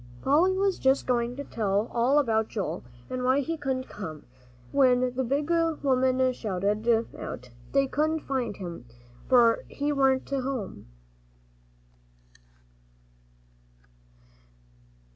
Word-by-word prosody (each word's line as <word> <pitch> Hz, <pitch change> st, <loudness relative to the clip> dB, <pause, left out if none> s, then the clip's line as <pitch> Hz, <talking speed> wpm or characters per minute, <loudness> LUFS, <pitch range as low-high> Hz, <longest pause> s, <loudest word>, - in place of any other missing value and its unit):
Polly 350 Hz, +7 st, +3 dB
was 390 Hz, -1 st, +1 dB
just 265 Hz, +1 st, +2 dB
going 240 Hz, -1 st, 0 dB
to 285 Hz, -, -5 dB
tell 210 Hz, -3 st, -1 dB
all 245 Hz, +4 st, +3 dB
about 220 Hz, -6 st, +2 dB
Joel, 205 Hz, -4 st, -3 dB, 0.2 s
and 255 Hz, 0 st, -4 dB
why 260 Hz, +3 st, +3 dB
he 330 Hz, +4 st, -2 dB
couldn't 265 Hz, -4 st, -3 dB
come, 160 Hz, -7 st, -8 dB, 0.5 s
when 255 Hz, -2 st, +3 dB
the 260 Hz, -, 0 dB
big 285 Hz, +6 st, -1 dB
woman 260 Hz, -6 st, +2 dB
shouted 215 Hz, +2 st, 0 dB
out, 125 Hz, 0 st, -7 dB, 0.2 s
"They 275 Hz, 0 st, +3 dB
couldn't 310 Hz, +3 st, 0 dB
find 260 Hz, -8 st, -2 dB
him, 170 Hz, -10 st, -7 dB, 0.4 s
for 235 Hz, -3 st, +5 dB
he 290 Hz, +1 st, -2 dB
warn't 270 Hz, -2 st, +2 dB
to 275 Hz, -1 st, -1 dB
home." 250 Hz, -, -5 dB
255 Hz, 115 wpm, -27 LUFS, 230-280 Hz, 0.5 s, for